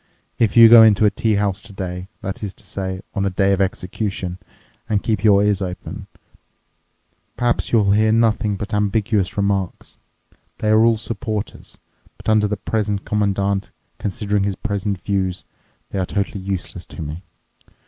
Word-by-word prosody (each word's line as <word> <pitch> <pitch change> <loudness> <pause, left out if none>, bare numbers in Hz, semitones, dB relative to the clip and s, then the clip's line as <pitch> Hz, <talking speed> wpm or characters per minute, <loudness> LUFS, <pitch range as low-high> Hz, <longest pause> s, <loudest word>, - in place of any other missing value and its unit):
If 115 -1 +2
you 115 -1 +11
go 115 0 +9
into 110 -1 +6
a 105 - +4
tea 110 +1 0
house 100 -1 0
today—that 95 -1 -7
is 100 -3 -5
to - - -17
say, 95 -1 -4
on 100 - -1
a 100 - +1
day 95 +1 +2
of 100 - 0
execution—and 95 +2 -4
keep 110 -3 -1
your 100 -2 +5
ears 105 -1 +1
open, 90 -1 -6 1.3
perhaps 120 -1 0
you'll 105 -4 +4
hear 110 +2 +3
nothing 110 -2 +2
but 105 +3 -6
ambiguous 105 -1 0
remarks. 100 -2 -2 0.6
They 110 - -1
are 110 +1 +5
all 115 -1 +4
supporters, 110 -1 -5 0.4
but - - -5
under 110 -1 +4
the 105 0 -2
present 105 -1 -2
Commandant, 100 -1 0 0.3
considering 105 0 -1
his 100 0 -1
present 100 -2 -3
views, 95 -2 -2 0.5
they 95 - -2
are 95 - 0
totally 100 0 -2
useless 95 -2 -5
to 85 - -8
me. 75 +3 -6
100 Hz, 155 wpm, -20 LUFS, 95-110 Hz, 1.3 s, you